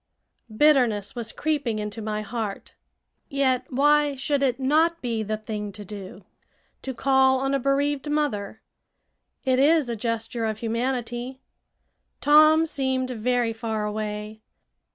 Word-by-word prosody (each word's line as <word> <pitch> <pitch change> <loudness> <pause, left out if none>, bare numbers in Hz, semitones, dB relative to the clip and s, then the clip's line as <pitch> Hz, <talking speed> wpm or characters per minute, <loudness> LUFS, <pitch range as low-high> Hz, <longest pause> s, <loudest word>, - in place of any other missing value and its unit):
Bitterness 245 -9 +3
was 235 -2 -4
creeping 290 -8 -1
into 210 +1 -5
my 215 0 -3
heart. 215 -2 -5 0.6
Yet 260 -2 0
why 290 +2 +3
should 275 +1 -1
it 265 -2 +1
not 315 +5 +2
be 230 -5 -2
"the 215 0 -2
thing 210 -1 -5
to 205 +1 -10
do" 195 -1 -9 0.6
to 265 -1 -5
call 265 +1 +3
on 270 +1 -1
a 275 - +2
bereaved 280 +2 0
mother? 240 -9 -2 0.8
It 260 -1 +2
is 295 -1 +4
a 235 - -2
gesture 230 +1 -3
of 220 -1 -2
humanity. 240 +2 -3 0.8
Tom 310 +2 +6
seemed 265 -4 -1
very 245 0 0
far 220 -2 -3
away. 210 0 -5
250 Hz, 130 wpm, -25 LUFS, 220-275 Hz, 0.8 s, Tom